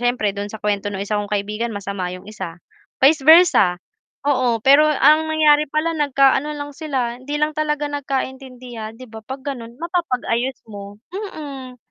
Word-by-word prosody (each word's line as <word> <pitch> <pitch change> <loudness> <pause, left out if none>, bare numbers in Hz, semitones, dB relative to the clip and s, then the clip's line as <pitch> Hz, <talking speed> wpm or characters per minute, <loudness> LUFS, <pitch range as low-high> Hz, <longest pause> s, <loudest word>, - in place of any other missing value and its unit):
siyempre 245 -4 0
do'n 205 0 -5
sa 220 - -7
kuwento 205 -1 -1
ng 195 - -4
isa 205 0 -1
kong 205 - -7
kaibigan 210 +3 -2
masama 200 -2 -4
'yong 185 0 -9
isa. 170 -5 -7 0.4
Vice 280 +1 +5
versa, 315 - +6 0.5
oo. 255 -5 +2
Pero 280 +3 +7
ang 305 +1 +4
nangyari 300 -1 +4
pala 325 +2 0
nagka-ano 285 -1 +2
lang 290 0 -6
sila, 260 -6 -3
hindi 290 +3 -4
lang 300 +1 +1
talaga 300 -1 -1
nagkaintindihan, 260 -5 -5
'di 255 - -10
ba, 220 0 -9
'pag 265 +3 -7
gano'n 235 -2 -10
mapapag-ayos 265 -7 -1
mo, 200 0 -9 0.2
mm. 290 -10 -7
260 Hz, 160 wpm, -20 LUFS, 215-300 Hz, 0.5 s, Pero